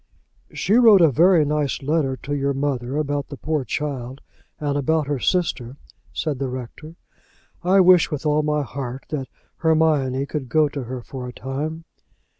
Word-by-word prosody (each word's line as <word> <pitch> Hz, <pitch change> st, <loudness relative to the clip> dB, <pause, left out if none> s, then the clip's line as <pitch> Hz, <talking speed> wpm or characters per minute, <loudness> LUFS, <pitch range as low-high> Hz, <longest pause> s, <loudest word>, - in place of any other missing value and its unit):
"She 200 Hz, -, -1 dB
wrote 225 Hz, -5 st, +7 dB
a 160 Hz, -3 st, +6 dB
very 165 Hz, +3 st, +4 dB
nice 145 Hz, -2 st, -1 dB
letter 140 Hz, -2 st, 0 dB
to 145 Hz, -, -3 dB
your 140 Hz, -1 st, 0 dB
mother 135 Hz, -1 st, -2 dB
about 145 Hz, -1 st, -2 dB
the 140 Hz, -, -9 dB
poor 155 Hz, -1 st, -2 dB
child, 130 Hz, -1 st, -4 dB, 0.4 s
and 145 Hz, -2 st, -1 dB
about 150 Hz, +2 st, +1 dB
her 140 Hz, -1 st, -2 dB
sister," 140 Hz, -7 st, -1 dB, 0.3 s
said 150 Hz, -5 st, -3 dB
the 135 Hz, -, -1 dB
rector. 130 Hz, +6 st, -8 dB, 0.7 s
"I 190 Hz, +2 st, +5 dB
wish 180 Hz, -2 st, +6 dB
with 150 Hz, -1 st, -5 dB
all 150 Hz, 0 st, +3 dB
my 150 Hz, -1 st, 0 dB
heart 130 Hz, +1 st, -6 dB
that 135 Hz, -4 st, -3 dB, 0.3 s
Hermione 155 Hz, -5 st, +2 dB
could 140 Hz, -3 st, -5 dB
go 155 Hz, +1 st, +3 dB
to 140 Hz, -3 st, -5 dB
her 125 Hz, 0 st, -6 dB
for 130 Hz, 0 st, -7 dB
a -, -, -6 dB
time." 155 Hz, +6 st, -5 dB
145 Hz, 170 wpm, -22 LUFS, 135-155 Hz, 0.7 s, wrote